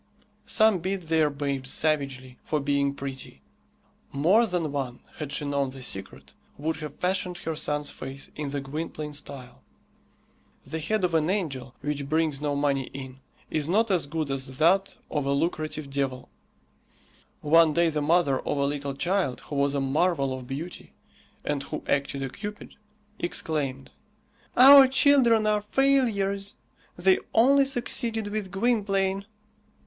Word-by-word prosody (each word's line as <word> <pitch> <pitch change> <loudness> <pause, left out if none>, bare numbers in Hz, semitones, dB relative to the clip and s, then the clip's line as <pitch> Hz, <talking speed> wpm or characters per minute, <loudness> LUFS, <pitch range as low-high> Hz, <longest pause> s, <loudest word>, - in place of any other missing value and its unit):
Some 220 -4 +4
beat 190 +2 -3
their 160 -2 +2
babes 140 -2 -3
savagely 135 -4 -1
for 155 - -1
being 140 0 0
pretty. 135 -1 -8 0.7
More 185 +12 +4
than 175 -6 -1
one, 130 -3 -4 0.2
had 150 -2 -5
she 150 - -3
known 140 -1 0
the 130 0 -9
secret, 95 -5 -6 0.2
would 160 +3 -2
have 150 -2 -7
fashioned 180 -1 -1
her 160 -2 -4
son's 150 -1 -1
face 135 +2 -7
in 150 -2 -4
the 140 +1 -2
Gwynplaine 150 +1 -5
style. 140 -3 -8 1.0
The 160 - -4
head 210 +6 -1
of 175 -2 +1
an 160 0 +2
angel, 135 -10 -3
which 145 -1 -3
brings 155 -2 +1
no 145 -1 -1
money 140 -2 +1
in, 130 -1 -8 0.3
is 155 0 -1
not 215 +4 +2
as 175 -6 +1
good 155 -1 -2
as 130 -1 -2
that 190 +6 +3 0.2
of 145 -2 -1
a 140 - +2
lucrative 155 0 -2
devil. 135 -2 -2 1.1
One 165 +1 +5
day 170 +2 +3
the 150 -1 -1
mother 150 -3 +2
of - - -3
a 140 - +1
little 140 -1 -3
child 175 -3 0
who 145 - -7
was 140 0 +1
a - - +1
marvel 140 0 +1
of 130 -1 -7
beauty, 155 +7 -7 0.5
and 145 -1 -1
who 150 +2 -6
acted 140 -1 0
a 135 - -3
cupid, 210 +8 -8 0.5
exclaimed, 145 -6 -2 0.7
"Our 270 +1 +10
children 260 -5 +4
are 210 0 +2
failures! 210 -5 +1 0.4
They 185 +1 +4 0.2
only 275 +4 +5
succeeded 235 -4 -1
with 205 -2 -3
Gwynplaine." 195 -2 0
155 Hz, 150 wpm, -26 LUFS, 140-195 Hz, 1.1 s, Our